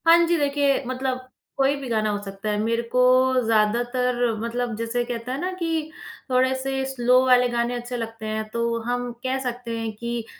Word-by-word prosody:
हाँ 335 +1 +9
जी, 340 0 +2
देखिए, 285 -2 +1
मतलब 255 0 -2 0.4
कोई 275 +1 +3
भी 270 - -6
गाना 215 -2 +1
हो 205 -1 -2
सकता 195 +1 -5
है। 210 - 0
मेरे 230 +2 0
को 250 - +4 0.4
ज़्यादातर 240 +3 +2 0.2
मतलब 235 +1 -2
जिसे 230 +2 -1
कहते 240 0 -4
हैं 260 - -2
ना 365 +3 -2
कि 325 -2 -1 0.4
थोड़े 260 +1 +3
से 270 0 -1
स्लो 250 0 +4
वाले 250 -1 +5 0.3
अच्छे 245 +1 -4
लगते 225 -1 -6
हैं। 215 0 -3
तो 235 0 0
हम 245 +1 -2
कह 260 0 0
सकते 245 -2 -4
हैं 225 -1 -3
कि 235 +1 -4
245 Hz, 185 wpm, -24 LUFS, 230-260 Hz, 0.4 s, हाँ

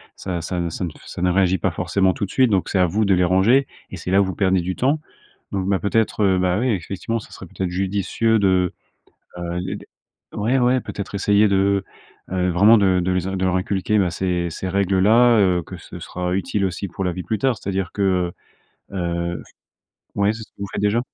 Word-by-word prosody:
ça 90 -3 -4
ça 90 +2 -3
ne 85 -1 -1
ça 90 +3 -4 0.4
ne 90 - +3
réagit 95 0 +2
pas 95 - 0
forcément 90 +3 +1
tout 100 - -2
de 95 - -10
suite, 130 -3 +3
donc 95 -3 +1
c'est - - 0
à 90 - +5
vous 105 +6 0
de 100 -2 +3
les 90 - +2
ranger 95 +10 +4 0.2
et 95 - -7
c'est 90 +2 -5
là 100 - +5
où - - +2
vous 95 - -4
perdez 95 -2 +2
du 90 +1 -3
temps. 140 +5 +1 0.5
Donc 95 -1 -2
bah, 100 -1 +1
peut-être, 110 0 0
heu, 95 -2 +3
bah 90 +1 +1
oui, 130 +2 +1
effectivement, 100 +3 -2
ça - - -13
serait - - -10
peut-être 95 +2 -4
judicieux 100 +4 0
de, 95 -3 +2 0.7
heu 85 - -5
heu, 90 +2 -3
de - - -12 0.5
ouais, 115 +6 +1
ouais. 125 +1 +3
Peut-être 100 0 -6
essayer 100 +1 +3
de, 100 0 +2 0.5
heu - - -4
heu, 90 0 +1
vraiment 100 +6 +6
de 95 -2 +3
de 90 - -1
les 90 0 -1
in 95 - -3
de 95 - -3
leur 95 0 +1
inculquer, 100 +3 0
bah, 95 -3 +2
ces 90 0 -1
ces 95 +3 -5
règles-là, 100 +5 +4
heu, 90 -4 +3
que - - -9
ce - - -10
sera 90 0 -3
utile 100 +1 -1
aussi 95 +2 -4
pour 90 - -6
la 90 - 0
vie 90 - -5
plus 110 +4 -2
tard, 130 +1 +1
c'est-à-dire 95 -2 -3
que, 95 -3 +1 0.6
heu - - -9
heu 85 -2 -2 0.7
ouais. 100 +1 +2
C'est 110 - -8
ce - - -26
que - - -66
vous 100 - -4
faites - - -3
déjà? 105 +3 +2
95 Hz, 235 wpm, -21 LUFS, 90-105 Hz, 0.7 s, vraiment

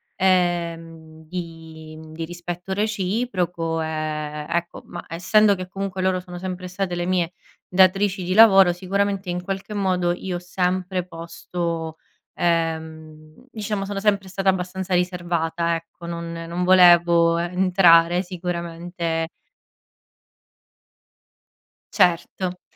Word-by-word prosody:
ehm, 165 -3 -1
di 160 -2 -8
di 165 +1 -5
rispetto 175 +2 -6
reciproco, 190 -5 -1
ehm, 155 -1 -3
ecco 170 0 -2
ma, - - -8
essendo 200 +5 +3
che 185 -1 -6
comunque 195 -1 -4
loro 185 0 +1
sono 180 -1 -9
sempre 185 0 -5
state 185 -1 -3
le 175 - -2
mie 180 -1 0 0.3
datrici 190 +1 +3
di 185 - -1
lavoro 195 -4 +7
sicuramente 195 +1 -1
in 175 0 -3
qualche 195 +2 -5
modo 180 -3 +1
io 180 0 -4
ho - - -7
sempre 180 0 -1
posto 165 -1 -5 0.4
ehm, 160 +1 -3
diciamo 210 -2 -3
sono 200 0 -4
sempre 200 -2 +1
stata 195 +1 0
abbastanza 185 0 -2
riservata 170 -2 0
ecco. 165 +1 -10
Non 170 0 -5
non 175 +2 -2
volevo 175 -2 +6
entrare 175 -1 +4
sicuramente 170 -2 -3 2.7
Certo 180 +1 +1
175 Hz, 110 wpm, -23 LUFS, 165-185 Hz, 2.7 s, lavoro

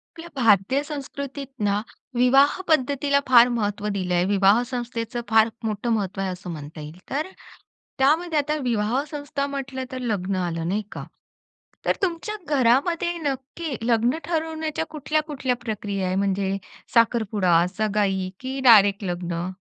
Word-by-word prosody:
आपल्या 335 +1 -9
भारतीय 230 +1 +3
संस्कृतीत 280 -1 -6 0.2
ना, 205 0 +1 0.3
विवाह 270 +6 +4
पद्धतीला 280 -1 +2
फार 245 -1 +7
महत्त्व 210 -3 -2
दिलंय. 180 -2 +1
विवाह 200 +3 +4
संस्थेचं, 240 -2 -4
फार 220 0 +5 0.2
मोठं 215 +2 -2
महत्त्व 195 -3 -2
आहे 190 - -1
असं 180 0 -7
म्हणता 155 0 -8
येईल. 150 +3 -9
तर 300 +5 -1 0.7
त्यामध्ये 315 +4 +3
आता 295 +1 -1
विवाह 235 +2 0
संस्था 285 -1 -3
म्हटलं 270 -2 -4
तर, 260 - -4
लग्न 200 -5 -1
आलं 170 -3 -2
नाही 200 +4 0
का. - - -6 0.8
तर, - - +2
तुमच्या 370 +4 -1 0.2
घरामध्ये 310 +8 +2
नक्की 285 +1 -4
लग्न 235 +4 +2
ठरवण्याच्या 320 -1 -2
कुठल्या 305 0 -1
,कुठल्या 265 -4 -1
प्रक्रिया 200 -3 -2
आहे? 185 - -1
म्हणजे 195 0 0 0.4
साखरपुडा, 210 -7 +3
सगाई, 200 -3 0
की 260 +1 -4
डायरेक्ट 205 -2 +6
लग्न. 175 -1 -3
235 Hz, 135 wpm, -24 LUFS, 195-280 Hz, 0.8 s, फार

